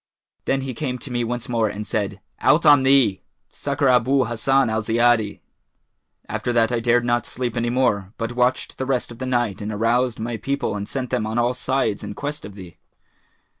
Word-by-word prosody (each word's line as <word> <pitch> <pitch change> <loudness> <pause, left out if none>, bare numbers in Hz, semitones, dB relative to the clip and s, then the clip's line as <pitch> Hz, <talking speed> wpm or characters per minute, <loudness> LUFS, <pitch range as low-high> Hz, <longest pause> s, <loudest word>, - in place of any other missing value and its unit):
Then 135 0 +1
he 130 -1 -4
came 125 0 -3
to 130 - -9
me 120 -1 0
once 120 +1 -3
more 115 -3 +1
and 105 +1 -6
said, 100 -2 -3 0.2
'Out 160 +3 +3
on 145 -2 +7
thee! 130 -8 +3 0.3
Succour 140 - -1
Abu 130 +1 +3
Hassan 125 +4 +2
al 110 0 0
Ziyadi!' 115 -1 +2 0.9
After 120 - -2
that 115 -1 +2
I 120 - +1
dared 120 +1 +2
not 120 -1 0
sleep 120 -2 -3
any 120 0 0
more, 110 -6 +1
but 115 0 -3
watched 125 +1 0
the 130 - -2
rest 130 -3 -1
of 120 - -11
the 130 - -3
night 120 -5 0
and 105 +1 -4
aroused 115 +3 +1
my 115 +1 -3
people 140 -3 -2
and 100 0 -5
sent 130 -2 -4
them 120 -4 0
on 110 +2 -3
all 120 +1 +2
sides 130 -4 -1
in 100 - -6
quest 145 +1 -5
of 100 -1 -10
thee.' 95 -4 -12
120 Hz, 205 wpm, -22 LUFS, 110-130 Hz, 0.9 s, on